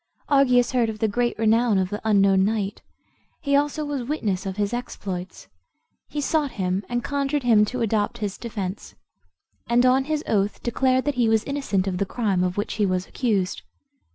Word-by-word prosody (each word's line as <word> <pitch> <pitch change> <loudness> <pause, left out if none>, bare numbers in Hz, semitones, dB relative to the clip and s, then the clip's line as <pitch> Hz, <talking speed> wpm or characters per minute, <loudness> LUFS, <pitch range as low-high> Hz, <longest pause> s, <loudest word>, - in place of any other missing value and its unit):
Argius 250 -4 +4
heard 245 -3 +2
of 220 - -5
the 220 - +1
great 240 +3 -1
renown 225 0 +3
of 190 0 0
the 210 - -4
unknown 195 -3 +4
knight; 205 -1 -1 0.6
he 280 -1 0
also 295 +1 +1
was 290 -2 -3
witness 215 -8 -2
of 190 +1 -5
his 205 +1 -1
exploits. 190 -7 -6 0.6
He 300 - -5
sought 295 -1 0
him, 185 -2 -1
and 240 0 -1
conjured 280 0 -1
him 220 -3 +5
to 255 +3 -4
adopt 220 0 0
his 205 -3 -4
defence, 205 -4 -5 0.7
and 240 +1 +3
on 260 +1 +4
his 305 0 -1
oath 205 -1 0
declared 255 +2 +1
that 290 - +1
he 230 - +3
was 220 -1 +3
innocent 275 -10 -1
of 185 -2 -2
the 200 - 0
crime 200 -6 0
of 180 +1 -2
which 205 - -2
he - - +4
was 185 0 -1
accused. 205 -7 -1
225 Hz, 185 wpm, -24 LUFS, 200-255 Hz, 0.7 s, him